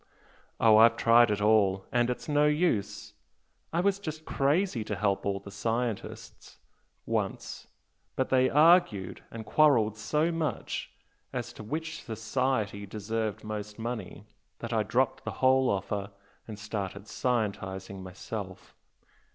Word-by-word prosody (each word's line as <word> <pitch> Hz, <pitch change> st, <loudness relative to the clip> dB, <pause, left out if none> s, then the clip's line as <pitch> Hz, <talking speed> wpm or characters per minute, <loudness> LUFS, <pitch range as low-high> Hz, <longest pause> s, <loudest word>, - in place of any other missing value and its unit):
Oh, 110 Hz, -1 st, +6 dB
I've 115 Hz, +1 st, +6 dB
tried 120 Hz, 0 st, +5 dB
it 105 Hz, -1 st, -1 dB
all 100 Hz, -3 st, +3 dB
and 120 Hz, 0 st, +2 dB
it's 125 Hz, -, -4 dB
no 150 Hz, 0 st, +3 dB
use. 110 Hz, -, 0 dB, 0.6 s
I 170 Hz, -, +1 dB
was 200 Hz, +1 st, +1 dB
just 155 Hz, -4 st, -6 dB
crazy 145 Hz, -, +1 dB
to 105 Hz, -, -3 dB
help 100 Hz, 0 st, 0 dB
all 100 Hz, -1 st, -1 dB
the 100 Hz, +1 st, -11 dB
scientists, 115 Hz, +2 st, -4 dB, 0.5 s
once! -, -, -3 dB, 0.5 s
but 130 Hz, -, 0 dB
they 130 Hz, 0 st, +4 dB
argued 150 Hz, -, +4 dB
and 115 Hz, -1 st, -8 dB
quarrelled 120 Hz, -9 st, +4 dB
so 150 Hz, +9 st, 0 dB
much 160 Hz, -7 st, -3 dB, 0.4 s
as -, -, -4 dB
to -, -, -10 dB
which 155 Hz, +7 st, -5 dB
'society' 110 Hz, -2 st, -2 dB
deserved 110 Hz, +1 st, -3 dB
most 105 Hz, -1 st, -6 dB
money 110 Hz, -3 st, -5 dB, 0.3 s
that 115 Hz, 0 st, -5 dB
I 110 Hz, -, +2 dB
dropped 130 Hz, +4 st, 0 dB
the -, -, -4 dB
whole 130 Hz, 0 st, +4 dB
offer, 100 Hz, 0 st, -2 dB, 0.4 s
and 110 Hz, -2 st, -7 dB
started 100 Hz, -1 st, -5 dB
'scientising' 100 Hz, -6 st, -2 dB
myself. 95 Hz, +1 st, -7 dB
110 Hz, 135 wpm, -29 LUFS, 100-130 Hz, 0.6 s, Oh